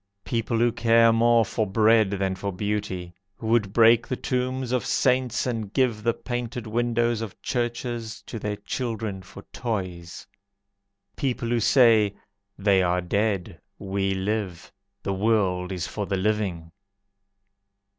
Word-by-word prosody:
People 115 +4 -1
who 120 +1 +3
care 115 0 +4
more 115 0 +4
for 110 +1 -1
bread 110 +1 +4
than 95 -1 -1
for 100 +1 -4
beauty, 95 -3 -3 0.2
Who - - -9
would 110 -4 +2
break 115 +1 +5
the 130 - -2
tombs 130 0 -2
of 125 -1 +1
saints, 125 -1 +1
And 115 -5 -3
give 120 -4 +1
the 115 +1 +1
painted 120 -1 -4
windows 120 0 0
of 110 -4 -7
churches 120 -2 -3
To 115 - -7
their 105 0 -3
children 110 -2 -4
for 95 +2 -12
toys. 95 -7 -4 0.9
People 125 -3 -2
who 120 0 +1
say: 110 -4 +4 0.4
"They 100 -1 +3
are 90 0 +1
dead, 100 -1 -1 0.2
we 95 0 -1
live! 95 -2 -3 0.3
The 100 - -1
world 95 -3 +1
is 90 -2 -3
for 105 -2 -4
the 95 - -1
living." 95 -5 -1
110 Hz, 140 wpm, -25 LUFS, 95-120 Hz, 0.9 s, break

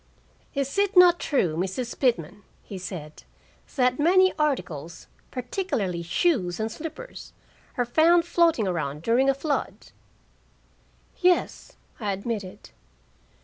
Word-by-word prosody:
"Is 275 +6 -1
it 400 -1 +1
not 350 -1 +7
true, 180 - 0
Mrs. 190 +8 -3
Pitman," 205 - 0 0.2
he 195 - -8
said, 170 -5 -8 0.5
"that 250 -1 +2
many 370 +4 +4
articles, 170 - -2 0.2
particularly 250 - -3
shoes 180 - 0
and 220 +1 -2
slippers, 330 - -9 0.4
are 245 - +1
found 330 +7 +4
floating 335 - +2
around 150 -4 -3
during 250 +6 +3
a 275 - +3
flood?" 285 +1 -3 1.3
"Yes," 360 -1 +1 0.3
I 210 -3 -1
admitted. 200 -1 -6
250 Hz, 110 wpm, -25 LUFS, -, 1.3 s, not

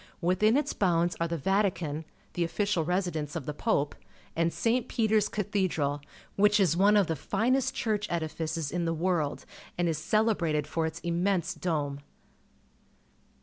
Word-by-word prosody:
Within 185 +7 +3
its 290 0 0
bounds 175 -2 +1
are 170 - +1
the 170 0 -2
Vatican, 175 -3 0 0.3
the 175 - 0
official 200 0 0
residence 170 -4 -2
of - - -4
the 150 - -3
Pope, 145 -4 0 0.4
and 165 0 +1
St. 235 +5 0
Peter's 220 -3 +2
Cathedral, 185 -9 -1 0.3
which 210 +1 +4
is 180 -5 +3
one 205 +3 +5
of 200 - +4
the 160 - -2
finest 255 - 0
church 210 -4 -1
edifices 160 -2 -3
in 175 -1 -1
the 165 0 0
world 165 -3 -1 0.3
and 175 0 +1
is 160 -2 -1
celebrated 170 -7 +1
for 160 +1 -1
its 160 +1 -7
immense 175 +1 0
dome. 150 -5 -2
175 Hz, 150 wpm, -29 LUFS, 160-205 Hz, 0.4 s, one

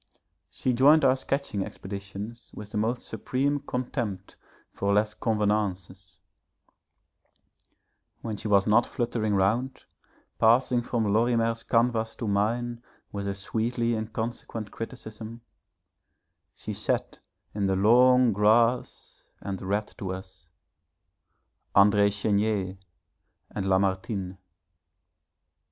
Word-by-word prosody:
She 130 - -1
joined 145 +6 +6
our 130 - +5
sketching 135 -6 -2
expeditions 100 +5 -8
with 105 0 -9
the - - -3
most 115 +3 -1
supreme 140 +3 -1
contempt 120 -8 -4 0.4
for 100 - -1
les 105 +1 +2
convenances; 100 -3 -2 2.1
when 110 -2 -3
she 110 - -5
was 100 -2 +4
not 110 +3 +4
fluttering 115 -4 -1
round, 110 +8 0 0.6
passing 120 +2 +4
from 115 -4 -1
Lorimer's 115 0 +2
canvas 115 -2 +1
to 115 - -4
mine 115 +4 0 0.3
with 100 -1 -4
her 100 - -2
sweetly 115 +4 -1
inconsequent 110 0 -4
criticism, 115 -1 -8 1.1
she - - -7
sat - - -2 0.3
in 100 -1 0
the 95 - +1
long 125 +4 +5
grass 115 +4 +1
and 95 -1 -5
read 100 +2 -2
to 95 -2 -3
us 95 -3 -11 1.3
André 100 +1 +6
Chénier 100 -2 0 0.7
and 95 -2 -3
Lamartine. 95 0 0
110 Hz, 105 wpm, -27 LUFS, 100-120 Hz, 2.1 s, joined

